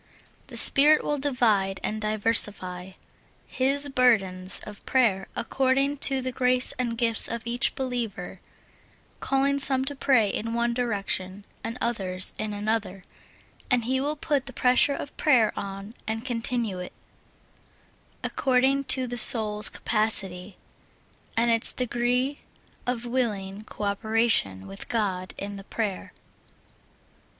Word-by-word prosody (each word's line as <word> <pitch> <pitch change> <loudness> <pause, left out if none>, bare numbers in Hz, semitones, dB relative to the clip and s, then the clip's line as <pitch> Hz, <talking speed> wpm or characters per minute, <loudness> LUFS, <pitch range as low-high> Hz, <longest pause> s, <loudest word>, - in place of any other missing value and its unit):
The - - -5
Spirit 300 +2 +7
will 295 -1 -2
divide 220 -9 0
and 215 0 -3
diversify 205 -4 +4 0.5
His 280 +2 -1
burdens 200 -8 +1
of 210 -1 -12
prayer 215 -7 +1
according 270 +3 0
to 270 -1 +2
the 255 0 -4
grace 250 0 +4
and 235 -2 -2
gifts 230 -2 0
of 230 -1 -6
each 240 +2 0
believer, 235 -8 -5 0.8
calling 275 +1 0
some 265 -1 +2
to 285 +1 -5
pray 260 -6 +2
in 225 +3 -4
one 235 0 0
direction 200 -5 -2 0.2
and 230 +2 -5
others 190 -6 0
in 215 - -3
an 205 +1 -6
other, 205 -4 -2 0.7
and 245 -2 +1
He 260 +3 -1
will 295 +2 -2
put 290 -3 -2
the 265 - -5
pressure 255 +4 +3
of 285 - -8
prayer 245 -8 +3
on 195 +2 -7
and 225 +2 -4
continue 230 -5 -2
it, 180 - -8 1.3
according 270 +1 +1
to 260 -1 +2
the 245 0 -5
soul's 215 -2 +1
capacity, 195 -4 0 0.8
and 235 +1 +2
its 230 0 +4
de 250 - -2
gree 250 +4 -1 0.5
of 245 -1 -3
willing 215 -5 -3
co 210 - -8
operation 200 - 0
with 95 0 -10
God 190 -5 -3
in 200 0 -7
the 195 - -10
prayer. 205 -2 -5
230 Hz, 135 wpm, -25 LUFS, 205-255 Hz, 1.3 s, Spirit